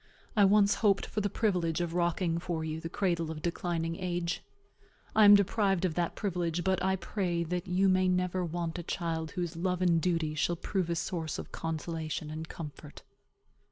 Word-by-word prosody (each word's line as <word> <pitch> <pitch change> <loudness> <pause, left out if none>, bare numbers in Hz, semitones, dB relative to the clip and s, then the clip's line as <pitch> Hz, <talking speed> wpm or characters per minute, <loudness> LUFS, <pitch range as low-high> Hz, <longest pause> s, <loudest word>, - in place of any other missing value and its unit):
I 205 -2 +6
once 200 +1 +5
hoped 200 -3 +3
for 210 - -3
the 205 - 0
privilege 180 -6 0
of 170 -1 -2
rocking 170 -1 +1
for 170 -2 -3
you 160 0 -3
the 165 - -5
cradle 170 -3 0
of 155 -1 -6
declining 170 -1 -2
age. 175 -2 -2 0.7
I 215 - +7
am 205 0 +10
deprived 200 -2 +2
of 175 - 0
that 170 0 -1
privilege; 175 -3 -1
but 190 -1 +1
I 190 0 +2
pray 175 -2 -1
that 175 +2 -3
you 185 +2 +3
may 185 0 +3
never 180 0 +1
want 170 0 -3
a - - -2
child 165 -2 -3
whose 175 -2 -2
love 180 +1 -1
and 170 -3 +3
duty 165 -3 0
shall 170 +3 0
prove 180 0 -2
a 170 - 0
source 165 -2 -3
of - - -7
consolation 160 -1 -4
and 160 +1 -6
comfort. 150 -2 -9
175 Hz, 190 wpm, -30 LUFS, 165-185 Hz, 0.7 s, am